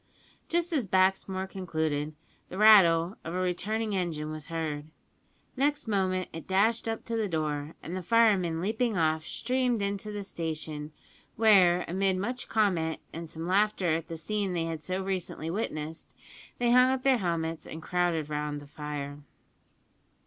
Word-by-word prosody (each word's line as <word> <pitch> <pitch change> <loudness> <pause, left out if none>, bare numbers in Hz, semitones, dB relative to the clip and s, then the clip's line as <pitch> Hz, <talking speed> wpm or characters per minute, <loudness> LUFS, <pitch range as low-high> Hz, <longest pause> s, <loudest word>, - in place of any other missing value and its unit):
Just 345 +1 0
as 265 -9 0
Baxmore 190 0 +2
concluded, 155 -5 -2 0.3
the 185 - -7
rattle 190 -4 +6
of 165 +2 -5
a - - 0
returning 210 +4 -1
engine 160 -5 -2
was 155 -1 -6
heard. 160 -3 -3 0.7
Next 285 0 0
moment 185 -3 0
it 165 - -8
dashed 220 +5 +2
up 225 0 -3
to 230 - -3
the 220 -2 0
door, 155 -2 -2
and 170 - -5
the 185 - -3
firemen, 190 -6 +3
leaping 220 +2 0
off, 160 -1 +1
streamed 250 -1 0
into 200 +1 -3
the 205 -1 -4
station, 155 -4 -4 0.4
where; 185 -5 +5
amid 190 +2 +1
much 245 +6 -3
comment 180 -7 +1
and 165 0 -6
some 160 +1 -6
laughter 190 -2 +2
at 160 0 -2
the 165 -1 -6
scene 200 +3 -2
they 170 -2 0
had 165 -2 -4
so 185 +5 -3
recently 185 -4 -3
witnessed, 160 -5 -4 0.4
they 240 -1 +2
hung 250 +1 +6
up 260 -1 -1
their 265 -3 +4
helmets 165 -3 -2
and 160 0 -8
crowded 175 -4 0
round 150 -1 -3
the 145 - -12
fire. 145 -1 -6
180 Hz, 160 wpm, -29 LUFS, 160-210 Hz, 0.7 s, rattle